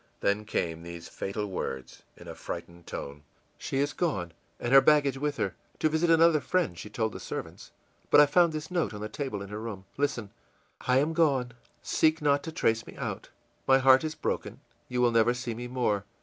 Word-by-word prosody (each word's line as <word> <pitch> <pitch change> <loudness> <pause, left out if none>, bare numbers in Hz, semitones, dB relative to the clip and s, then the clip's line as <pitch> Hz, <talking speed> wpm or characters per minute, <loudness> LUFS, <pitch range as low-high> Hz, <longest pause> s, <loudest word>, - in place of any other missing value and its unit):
Then 105 +2 +1
came 85 -5 -2
these 85 0 -8
fatal 105 +2 -4
words, 65 -9 -5 0.2
in - - -13
a - - -6
frightened 85 -1 -8
tone: 70 +1 -6 0.4
ìShe - - -7
is 140 0 +1
gone, 115 - -1 0.3
and 120 +2 -1
her 135 - +10
baggage 140 -3 +3
with 145 0 -1
her. - - -1 0.2
To 155 - +2
visit 160 +2 +1
another 165 -2 +5
friend, 175 - 0
she 85 +5 -8
told 110 -2 -2
the - - -7
servants. - - -7 0.4
But - - +7
I 150 - +9
found 170 +3 +4
this 155 +2 -6
note 170 -11 0
on 105 - -7
the 105 - -3
table 110 -4 -4
in 100 - -9
her 105 +1 -5
room. 105 -4 -6
Listen: 120 -7 -1 0.6
'I 125 0 +4
am 150 +4 +2
gone; 140 -7 +2 0.3
seek 160 0 +2
not 145 -1 +2
to 160 - -4
trace 115 -7 0
me - - -11
out; - - -5 0.4
my 135 - +7
heart 130 +1 +6
is 155 0 -3
broken; - - -3 0.3
you 125 0 0
will 120 -1 +4
never 115 +1 +3
see 125 -1 -4
me 120 +2 -6
more. 120 -5 0
125 Hz, 205 wpm, -28 LUFS, 105-150 Hz, 0.6 s, her